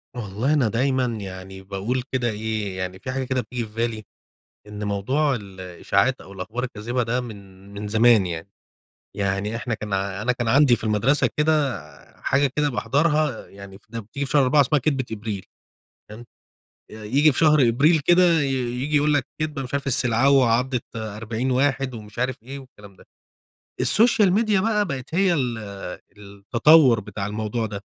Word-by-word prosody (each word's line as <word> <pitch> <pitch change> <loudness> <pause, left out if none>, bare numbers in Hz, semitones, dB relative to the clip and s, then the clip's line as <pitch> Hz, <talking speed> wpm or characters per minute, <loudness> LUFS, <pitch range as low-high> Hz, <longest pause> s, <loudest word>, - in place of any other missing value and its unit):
والله 115 +4 -2
أنا 140 -6 +2
دايمًا 130 +3 +1
يعني 95 -4 -7
باقول 100 +6 -3
كده 125 -2 0
إيه، 105 -3 -4
يعني 95 0 -5
في 130 - -5
حاجة 135 0 -2
كده 130 0 -1
بتيجي 120 -1 -5
في 105 - -15
بالي 115 -1 -2 0.6
إن 105 0 -7
موضوع 130 +9 0
الإشاعات 100 +4 -2
أو 100 - -13
الأخبار 110 +6 -5
الكاذبة 120 0 -3
ده 120 +2 -1
من 100 -4 -12
من 105 +1 -6
زمان 110 -1 +4
يعني، 85 +1 -6 0.7
يعني 100 +2 -2
إحنا 120 +1 -3
كان 105 -2 -5
ع 95 0 -2
أنا 125 +4 +1
كان 120 -1 -3
عندي 135 +1 +5
في - - -11
المدرسة 120 +5 +2
كده 150 -7 +1 0.4
حاجة 140 +1 +2
كده 150 -1 +1
باحضرها، 150 0 0
يعني 100 -1 -12
ف - - -28
لما 115 0 -5
بتيجي 140 +7 -5
في - - -8
شهر 145 -2 +4
4 145 +3 +4
اسمها 145 +2 +2
كدبة 135 -1 -1
إبريل، 105 -3 -5 0.6
تمام، 110 +3 -11 0.7
ي - - -11
ييجي 130 +8 +2
في - - -5
شهر 150 -6 +4
أبريل 150 +7 +3
كده 175 +1 +4
ي - - 0 0.4
ييجي 150 +3 0
يقول 150 +1 +3
لك 145 -4 0
كدبة، 150 -3 -2
مش 130 +2 -7
عارف 140 0 -2
السلعوة 130 +1 +3
عضت 125 +1 -1
40 110 +3 -4
واحد 135 0 0
ومش 105 0 -11
عارف 125 -2 -2
إيه 135 +4 -8
والكلام 105 -7 -15
ده، - - -18 0.8
السوشيال 220 -4 +5
ميديا 210 -2 +2
بقى 210 0 +1
بقت 140 -2 -5
هي 190 -1 +3
ال 125 -7 -1 0.6
التطوّر 115 +7 +3
بتاع 105 -1 -6
الموضوع 110 +2 -3
ده، 100 -2 -6
120 Hz, 175 wpm, -23 LUFS, 105-140 Hz, 0.8 s, عندي